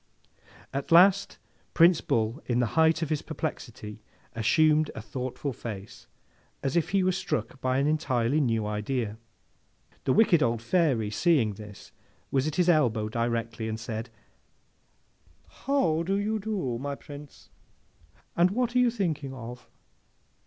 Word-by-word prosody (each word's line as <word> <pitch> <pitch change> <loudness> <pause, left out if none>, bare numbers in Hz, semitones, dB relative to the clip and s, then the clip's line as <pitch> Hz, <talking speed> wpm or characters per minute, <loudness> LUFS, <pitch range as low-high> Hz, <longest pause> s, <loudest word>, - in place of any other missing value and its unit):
At 140 +3 -4
last, 190 +4 +5 0.4
Prince 170 0 +6
Bull 115 +6 -1
in 120 - +1
the 125 - +3
height 160 +1 +3
of 160 - -4
his 150 - 0
perplexity 105 0 -6 0.3
assumed 155 +7 +3
a - - -5
thoughtful 130 +4 -4
face, 110 +1 -8 0.6
as 135 +4 -1
if 170 0 +1
he 195 0 +2
were 185 - +3
struck 135 - -3
by 130 0 +1
an 140 - +2
entirely 145 -3 +1
new 115 -5 0
idea. 105 +1 -2 0.9
The 130 - +3
wicked 175 - +4
old 115 -2 +1
Fairy, 120 - +1
seeing 130 - +2
this, 105 0 -12 0.4
was 135 +1 +1
at 155 - -3
his 180 -1 +2
elbow 120 -10 +2
directly, 115 0 -2
and 110 0 -4
said, 115 +1 -5 1.4
'How 205 - 0
do 190 +4 0
you 215 +2 -1
do, 190 - -3
my 140 +1 -3
Prince, 145 0 -12 0.8
and 175 +1 +4
what 240 +4 -1
are - - +5
you 250 -1 +4
thinking 155 - -2
of? 125 0 -9
140 Hz, 145 wpm, -27 LUFS, 115-170 Hz, 1.4 s, Prince